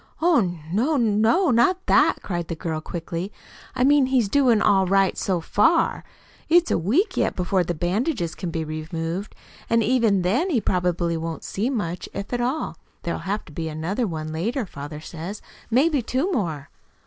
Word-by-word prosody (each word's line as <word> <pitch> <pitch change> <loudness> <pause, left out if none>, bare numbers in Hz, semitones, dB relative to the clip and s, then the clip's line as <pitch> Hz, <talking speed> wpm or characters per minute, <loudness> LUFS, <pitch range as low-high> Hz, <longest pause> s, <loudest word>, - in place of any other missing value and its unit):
"Oh, 335 -3 +4 0.3
no 260 - +1
no 230 - +3
not 300 +11 +3
that!" - - +3
cried 175 -3 -3
the 165 - -4
girl 160 -1 -3
quickly. 170 +3 -5 0.4
"I 250 - +1
mean 280 0 +5
he's 250 -6 +2
doing 250 -3 +4
all 195 -3 +3
right 195 0 +3
so 185 -3 -1
far. 325 - +2 0.5
It's 345 +1 +4
a - - +3
week 330 - +1
yet - - +1
before 180 0 +1
the 175 0 -3
bandages 180 - -1
can 180 - -5
be 165 -1 -2
removed, 165 +4 -4 0.3
and 230 0 +3
even 220 -5 +2
then, 250 - +1
he 280 -9 +2
probably 180 -4 0
won't 165 0 -5
see 215 +6 -2
much 185 -9 -3
if 200 +4 -5
at 245 - 0
all. 260 +6 -2 0.3
There'll 170 - -2
have 205 +2 -2
to - - -14
be 160 +1 -4
another 175 +10 -2
one 155 -3 -5
later 225 - -1
father 150 -2 -8
says 170 +6 -7 0.3
maybe 280 +4 +3
two 265 - -1
more." 165 - -2
200 Hz, 175 wpm, -23 LUFS, 170-255 Hz, 0.5 s, mean